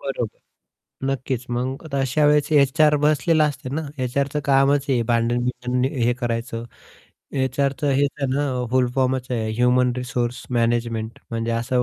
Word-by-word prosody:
बरोबर. 130 -5 -4 0.7
नक्कीच 130 -2 -2
मग 130 +5 -3
अशा 135 +2 +1
वेळेस 150 0 +3
एचआर 150 +1 +4
बसलेला 155 +2 +3
असते 145 -3 -3
ना, 160 - -1 0.2
एचआरच 140 +3 -1
कामच 140 +1 +3
आहे 125 -3 +2
भांडण 120 +1 +2
बिंडण 125 0 -1 0.2
हे 120 - +3
करायचं. 115 -1 -3 0.7
एचआरच 135 +2 -1
हेच 140 0 +3
आहे 140 - +1
ना 135 -3 -1
फुल 130 -1 +3
फॉर्मच 130 -1 +1
आहे 110 -3 -1
ह्युमन 125 +1 +3
रिसोर्स 125 -1 -2
मॅनेजमेंट 115 -2 -1
म्हणजे 115 0 -2
असं 125 +2 0
130 Hz, 140 wpm, -22 LUFS, 120-140 Hz, 0.7 s, एचआर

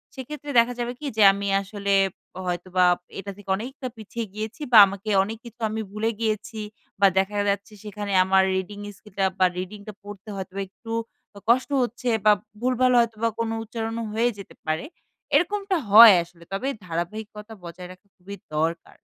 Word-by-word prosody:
সেক্ষেত্রে 290 +2 -7
দেখা 235 +1 +3
যাবে 240 0 -2
কি 300 - -7
যে 215 - +5
আমি 200 0 -4
আসলে 200 0 -2 0.5
হয়তোবা 180 +1 +1 0.3
এটা 200 +1 -6
থেকে 205 -1 -14
অনেকটা 255 +5 -6
পিছিয়ে 225 +2 -5
গিয়েছি 220 +6 -6
বা 235 - +8
আমাকে 200 +2 -6
অনেক 220 +3 -5
কিছু 235 +1 -12
আমি 220 +1 -3
ভুলে 215 +2 -1
গিয়েছি 220 0 -2 0.4
বা 200 - +7
দেখা 195 +2 +1
যাচ্ছে 200 +2 -2
সেখানে 205 -1 -5
আমার 190 +1 +4
রিডিং 190 +2 -4 0.2
স্কিলটা 200 -2 -3
বা 185 - +6
রিডিংটা 200 +3 -7
পড়তে 205 0 -10
হয়তোবা 190 0 -5
একটু 225 +4 -11 0.5
আ - - -8
কষ্ট 255 +4 +3
হচ্ছে 245 +1 -3 0.2
বা 210 - +8 0.3
ভুলভাল 255 0 +2
হয়তোবা 230 -1 +1
কোনো 225 -1 -1
উচ্চারণও 225 +1 -4
হয়ে 230 +2 +2
যেতে 200 - -11
পারে। 155 - -1 0.5
এরকমটা 395 +1 +1
হয় 220 +1 +11
আসলে 170 0 -18
তবে 200 +7 -2 0.2
ধারাবাহিকতা 210 +6 -5
বজায় 175 +1 -9
রাখা 185 +2 -16
খুবই 195 +2 -9 0.2
দরকার। 165 +2 -2
210 Hz, 165 wpm, -24 LUFS, 195-230 Hz, 0.5 s, হয়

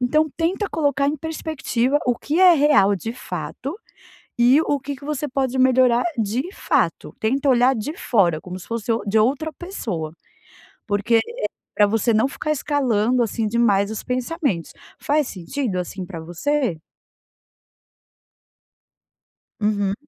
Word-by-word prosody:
Então, 305 +6 +2
tenta 365 +5 0
colocar 285 -3 +1
em 300 - -1
perspectiva 290 -4 -1
o 245 -1 +2
que 315 +5 -1
é 365 -2 +8
real, 275 -10 +4
de 225 +5 -5
fato, 240 - -6 0.6
e 250 +6 +5
o 290 -3 0
que 280 +2 -5
que 280 +2 -13
você 295 0 -2
pode 265 -1 -1
melhorar, 255 -2 +4
de 235 - -1
fato. - - 0
Tenta 270 +5 +1
olhar 255 +1 +4
de 285 +9 -4
fora, 175 -9 +2
como 180 0 -7
se - - -12
fosse 230 0 -2
o 225 -2 0
de 210 +2 +1
outra 275 +8 +1
pessoa, 210 - -5 0.7
porque 205 +3 +2
é - - +5 0.5
para 205 - +5
você 225 +2 +1
não 220 +4 +3
ficar 305 - -4
escalando, 255 -5 +1
assim, 225 0 -1
demais 210 -3 +2
os 220 - -5
pensamentos. 250 - -2 0.3
Faz 295 -2 +1
sentido, 200 +3 -4
assim, 180 +1 -5
para 175 -4 -7
você? 185 - -1 2.8
Uhum. 205 -2 +1
245 Hz, 145 wpm, -22 LUFS, 210-290 Hz, 2.8 s, é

